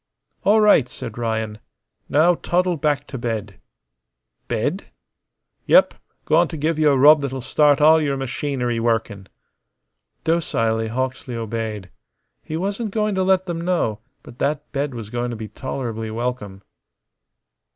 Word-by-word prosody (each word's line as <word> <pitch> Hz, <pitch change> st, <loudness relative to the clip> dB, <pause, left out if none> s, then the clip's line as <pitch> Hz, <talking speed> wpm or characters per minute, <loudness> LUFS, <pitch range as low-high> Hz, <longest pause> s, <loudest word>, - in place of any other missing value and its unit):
"All 215 Hz, +2 st, +4 dB
right," 205 Hz, -, +5 dB
said 115 Hz, +1 st, -8 dB
Ryan. 110 Hz, -2 st, -2 dB, 0.5 s
"Now 160 Hz, +5 st, +4 dB
toddle 180 Hz, +1 st, 0 dB
back 145 Hz, -1 st, 0 dB
t' 135 Hz, -, -7 dB
bed." 110 Hz, -5 st, -4 dB, 0.9 s
"Bed?" -, -, -2 dB, 0.8 s
"Yep. -, -, +5 dB, 0.3 s
Goin' 165 Hz, +2 st, +4 dB
t' 160 Hz, -, -7 dB
give 155 Hz, +2 st, -1 dB
you 155 Hz, -1 st, +4 dB
a 140 Hz, -, +3 dB
rub 150 Hz, +3 st, +7 dB
that'll 135 Hz, -1 st, -3 dB
start 145 Hz, +3 st, +3 dB
all 155 Hz, +2 st, +6 dB
your 140 Hz, -2 st, -1 dB
machinery 130 Hz, -2 st, -2 dB
workin'." 110 Hz, -4 st, -1 dB, 1.0 s
Docilely 115 Hz, -9 st, 0 dB
Hawksley 130 Hz, +2 st, -3 dB
obeyed. 110 Hz, -4 st, -4 dB, 0.5 s
He 155 Hz, -, -5 dB
wasn't 200 Hz, +5 st, -2 dB
going 210 Hz, 0 st, 0 dB
to 190 Hz, -, 0 dB
let 185 Hz, 0 st, +2 dB
them 170 Hz, -2 st, -4 dB
know, 170 Hz, -, 0 dB, 0.2 s
but 120 Hz, -, -14 dB
that 150 Hz, +1 st, -2 dB
bed 140 Hz, -1 st, -2 dB
was 110 Hz, -3 st, -7 dB
going 120 Hz, 0 st, -2 dB
to 120 Hz, -, -5 dB
be 110 Hz, -1 st, -7 dB
tolerably 115 Hz, -5 st, -5 dB
welcome. 110 Hz, -4 st, -4 dB
135 Hz, 140 wpm, -21 LUFS, 115-160 Hz, 1.0 s, rub